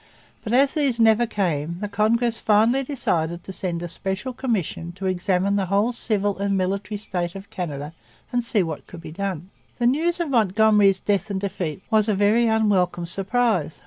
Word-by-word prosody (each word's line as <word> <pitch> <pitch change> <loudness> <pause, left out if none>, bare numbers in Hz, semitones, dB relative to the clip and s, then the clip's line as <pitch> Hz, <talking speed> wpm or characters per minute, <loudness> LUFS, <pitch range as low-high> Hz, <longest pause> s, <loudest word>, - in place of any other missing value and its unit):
But 215 - -4
as 270 +3 +4
these 275 -6 0
never 225 +1 +4
came 170 -6 -2
the 210 - -3
Congress 225 +3 +1
finally 220 +5 +3
decided 175 - -1
to 190 - -8
send 175 -2 -3
a - - -3
special 190 +8 -4
commission 195 - -3
to 195 +2 -7
examine 190 +1 +1
the 195 -2 -1
whole 200 +5 +2
civil 205 -4 -1
and 200 -1 0
military 195 +3 -2
state 180 -4 -4
of 195 +1 -10
Canada 150 -3 -5 0.4
and 245 0 +1
see 220 -4 +2
what 160 -3 -6
could 175 - -10
be 160 - -9
done. 185 0 -4 0.3
The 240 - 0
news 325 +8 +1
of 335 -5 -2
Montgomery's 210 -3 +4
death 205 0 0
and 195 -1 -2
defeat 185 -4 -4
was 220 0 +3
a 210 - +2
very 210 +4 +3
unwelcome 200 -6 +1
surprise. 195 -2 0
200 Hz, 180 wpm, -23 LUFS, 180-225 Hz, 0.4 s, as